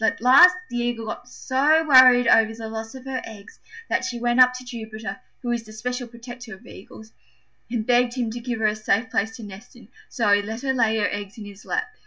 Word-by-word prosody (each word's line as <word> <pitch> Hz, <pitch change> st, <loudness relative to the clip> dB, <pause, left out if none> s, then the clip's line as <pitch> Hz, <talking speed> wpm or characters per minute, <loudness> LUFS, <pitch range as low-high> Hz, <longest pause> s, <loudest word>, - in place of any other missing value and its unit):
At 220 Hz, -, +1 dB
last 340 Hz, +10 st, +7 dB
the 240 Hz, -, -6 dB
Eagle 240 Hz, -1 st, -2 dB
got 245 Hz, +3 st, -8 dB
so 295 Hz, +6 st, +1 dB
worried 255 Hz, -3 st, +7 dB
over 225 Hz, 0 st, +4 dB
the 225 Hz, 0 st, -8 dB
loss 225 Hz, +2 st, -7 dB
of 260 Hz, 0 st, -11 dB
her 265 Hz, -1 st, -4 dB
eggs 215 Hz, -2 st, -13 dB, 0.3 s
that -, -, -1 dB
she 240 Hz, -, -4 dB
went 240 Hz, +1 st, 0 dB
up 255 Hz, 0 st, +7 dB
to 255 Hz, 0 st, -9 dB
Jupiter, 225 Hz, -1 st, -7 dB, 0.2 s
who 240 Hz, -, -2 dB
is 240 Hz, -1 st, -1 dB
the 215 Hz, -1 st, -15 dB
special 250 Hz, +3 st, -5 dB
protector 240 Hz, -1 st, -11 dB
of 190 Hz, -, -20 dB
Eagles, 220 Hz, +3 st, -14 dB, 0.6 s
and 230 Hz, -2 st, -3 dB
begged 245 Hz, 0 st, +2 dB
him 240 Hz, -3 st, -2 dB
to 240 Hz, -, -6 dB
give 240 Hz, -1 st, -4 dB
her 220 Hz, -, -1 dB
a 210 Hz, 0 st, +1 dB
safe 215 Hz, +3 st, -1 dB
place 225 Hz, -1 st, -1 dB
to 235 Hz, -, -10 dB
nest 205 Hz, +6 st, -12 dB
in: 240 Hz, -3 st, -17 dB, 0.2 s
so 225 Hz, -5 st, 0 dB
he 205 Hz, 0 st, +4 dB
let 220 Hz, +3 st, -7 dB
her 270 Hz, -1 st, -1 dB
lay 225 Hz, -3 st, +1 dB
her 210 Hz, -, +1 dB
eggs 205 Hz, 0 st, -7 dB
in 215 Hz, -, -9 dB
his 200 Hz, 0 st, -13 dB
lap. 440 Hz, +1 st, -2 dB
235 Hz, 240 wpm, -23 LUFS, 220-250 Hz, 0.6 s, last